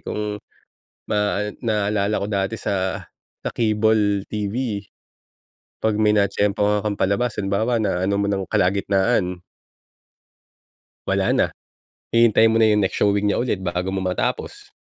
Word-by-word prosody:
kung 105 -1 -4 0.7
ma 105 -1 +1 0.2
naalala 105 -1 0
ko - - -1
dati 100 +1 -1
sa 95 -2 -1 0.4
sa - - -3
cable 110 -2 +2
TV, 105 0 -3 0.9
'pag 110 -1 0
may 105 - +4
natiyempuhan 105 0 +1
kang 105 -1 -2
palabas, 105 +5 0
halimbawa, 105 +5 0
naano 95 -2 0
mo 100 - +1
ng 100 -1 -1
kalagitnaan 95 0 +1 1.7
wala - - +1
na. - - +3 0.6
Hihintayin 115 -1 +5
mo 110 - +2
na 115 - +5
yung 105 - +2
next 95 - -1
showing 100 0 +2
niya - - +1
ulit 120 -6 -1
bago 90 +1 -2
mo 95 - -1
matapos. 90 -1 -3
105 Hz, 130 wpm, -22 LUFS, 100-110 Hz, 1.7 s, Hihintayin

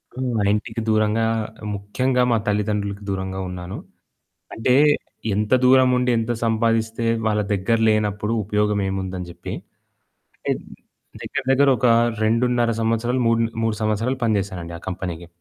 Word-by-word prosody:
హ్మ్. 130 0 -2
మా 105 - +1
ఇంటికి 110 +1 -3
దూరంగా, 110 +1 +2 0.5
ముఖ్యంగా 125 +6 0
మా 115 - +4
తల్లిదండ్రులకి 105 -1 -1
దూరంగా 95 0 -3
ఉన్నాను. 90 0 -6 0.8
అంటే 120 +3 +2 0.6
ఎంత 105 +3 -1
దూరముండి, 125 -1 +4
ఎంత 115 +1 -1
సంపాదిస్తే 115 0 0 0.2
వాళ్ళ 105 -1 +2
దగ్గర 100 +4 +1
లేనప్పుడు 105 0 0
ఉపయోగమేముందని 95 -3 -1
జెప్పి. 85 - -8 1.0
అంటే - - +2 0.7
దగ్గర 145 - -4
దగ్గర 140 +1 +4
ఒక 125 - +2 0.4
2.5 120 +1 +2
సంవత్సరాలు 115 +3 0
మూడు 115 0 +3 0.2
మూడు 115 -1 0
సంవత్సరాలు 110 +5 0
పని 110 -2 +2
జేసానండి 90 -3 -6
ఆ - - -24
కంపెనీకి. 85 -2 -5
110 Hz, 125 wpm, -22 LUFS, 100-115 Hz, 1.0 s, మా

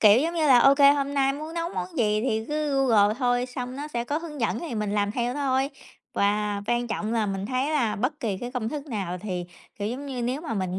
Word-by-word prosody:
Kiểu 210 +1 +7
giống 335 +3 -1
như 320 -2 +2
là 260 -4 +7
OK, 275 +4 +6 0.2
hôm 280 0 -2
nay 275 -1 +3
muốn 310 +3 -7
nấu 335 0 -1
món 180 0 -4
gì 215 -2 +2
thì 220 -3 0
cứ 300 -1 -1
Google 210 -3 +4
thôi, 245 -1 +1
xong 250 0 -6
nó 290 +2 -5
sẽ 235 -5 -2
có 290 +5 -1
hướng 315 -4 -8
dẫn 225 -2 0
thì 325 -8 -5
mình 210 -2 -1
làm 205 0 +1
theo 245 +2 -1
thôi. 270 -1 +1 0.4
Và 205 -1 +1
quan 240 +1 +1
trọng 220 -1 -2
là 225 -2 +1
mình 195 0 -3
thấy 260 +5 0
là 240 -9 +1
bất 255 +8 -2
kỳ 210 -5 -1
cái 245 +3 -5
công 245 -4 -2
thức 290 +3 -5
nào 195 - -3
thì, 180 -2 -4 0.3
kiểu 205 - -2
giống 265 +5 -5
như, 255 -3 -4
nếu 250 +4 -1
mà 310 -7 -4
mình 185 -2 -2
245 Hz, 255 wpm, -26 LUFS, 210-280 Hz, 0.4 s, Kiểu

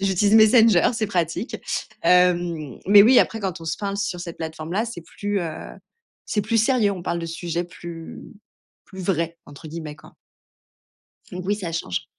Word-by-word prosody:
J'utilise 195 +2 +2
Messenger, 220 -3 +6
c'est 225 -2 -1
pratique, 175 - -2 0.5
hem, 175 -6 +2
mais 200 +1 +8
oui 245 +4 +6
après, 225 - +1
quand 185 -4 -4
on - - -9
se 160 - -2
parle 200 -1 -3
sur 190 -3 -3
cette 170 -1 -7
plateforme 160 0 -6
là 215 +5 +1
c'est 230 -7 -7
plus, 205 +3 -3
heu, 170 - -3 0.8
c'est 210 - -1
plus 225 +2 0
sérieux. 225 -2 +3
On 180 -3 -7
parle 170 -1 -2
de 165 - -4
sujets 170 +1 -3
plus 170 -1 -9 0.6
plus 190 - -11
«vrais» 170 -2 -1
entre 145 +3 -12
guillemets 155 -2 -7
quoi. - - -17 1.2
Donc, 180 0 -6
oui 205 - +2
ça 185 -5 -5
change. 90 - -3
180 Hz, 175 wpm, -23 LUFS, 165-205 Hz, 1.2 s, mais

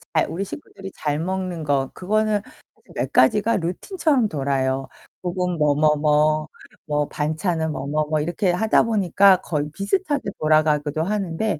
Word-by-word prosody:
잘 155 - +3
우리 190 +4 -3
식구들이 195 -4 -9
잘 150 -1 -2
먹는 185 -1 -3
거 140 -3 0
그거는 215 +2 0 0.3
사실 - - -23
몇 - - -2
가지가 225 0 +4
루틴처럼 255 - 0
돌아요. 135 -3 -1 0.4
혹은 180 0 -2
뭐 150 -2 +2
뭐 150 +1 +3
뭐 150 +1 +2 0.4
뭐 150 -2 0
반찬은 160 +1 -1
뭐 135 -2 -5
뭐 150 +1 0
뭐 155 -1 +1
이렇게 175 +4 0
하다 215 +5 +3
보니까 200 -3 +4
거의 150 -2 -2
비슷하게 285 - -1
돌아가기도 155 -1 +2
하는데 195 -1 -2
165 Hz, 315 characters per minute, -22 LUFS, 150-200 Hz, 0.4 s, 가지가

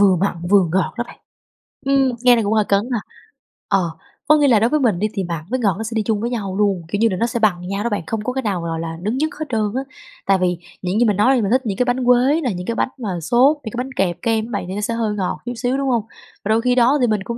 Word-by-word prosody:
vừa 195 -3 +5
mặn, 185 0 0
vừa 200 -2 +6
ngọt 190 - 0
đó 240 - 0
bạn. - - -14 0.7
Ừm, 270 -1 +3
nghe 245 -1 +7
thì 230 - +1
cũng 205 +2 0
hơi 215 -2 +2
cấn 200 0 +3
ha. 225 - +1 0.7
Ờ, 180 -4 +1 0.4
có 305 +1 +6
nghĩa 290 -1 +4
là 230 -5 +5
đối 230 - +2
với 305 +2 +2
mình 220 -9 +1
đi 215 - +1
thì 195 -3 -2
mặn 170 -3 -4
với 255 +1 -1
ngọt 200 -6 +1
nó 220 - -4
sẽ 220 - -5
đi 220 - +1
chung 215 -1 -1
với 235 - -1
nhau 200 -6 -3
luôn, 200 -4 +1
kiểu 205 +4 -2
như 225 0 +4
là, 185 - -2
nó 230 - +1
sẽ 235 - -2
bằng 180 -5 +1
nhau 200 +2 -2
đó 235 - 0
bạn, 205 - -1
không 225 -2 -2
có 250 - -2
cái 265 - -1
nào 195 -5 -1
gọi 165 -1 -3
là 165 0 -5
đứng 215 +7 -1
nhất 310 +2 +1
hết 310 - -2
trơn 225 -3 0
á. 265 - 0 0.4
Tại 195 -1 +4
vì 180 -1 0 0.2
những 185 +4 -1
gì 240 - +4
mình 205 -3 +1
nói 255 +6 +4
đi 240 - +2
mình 200 - -1
thích 260 +2 +3
những 195 -3 -2
cái 250 - +2
bánh 245 0 0
quế 255 +6 +4
nè, 245 -8 -1
những 180 0 -6
cái 230 - -1
bánh - - 0
mà 225 -6 -4
xốp, 250 - +4
những 220 - -5
cái - - -6
bánh 265 - -8
kẹp 180 -6 0
kem 225 -2 0
á 235 - -10
bạn 200 -5 -2
thì 190 - -5
nó 210 - -3
sẽ 230 +2 -1
hơi 220 -2 -1
ngọt 190 -3 -2
chút 245 - -3
xíu, 245 +3 -1
đúng 275 -1 -1
hông? 235 -4 +1 0.4
Và 210 - -2
đôi 225 +1 +3
khi 250 0 +2
đó 255 +4 +4
thì 245 - +3
mình 215 -3 0
cũng 235 +3 -5
220 Hz, 325 wpm, -20 LUFS, 195-245 Hz, 0.7 s, nghe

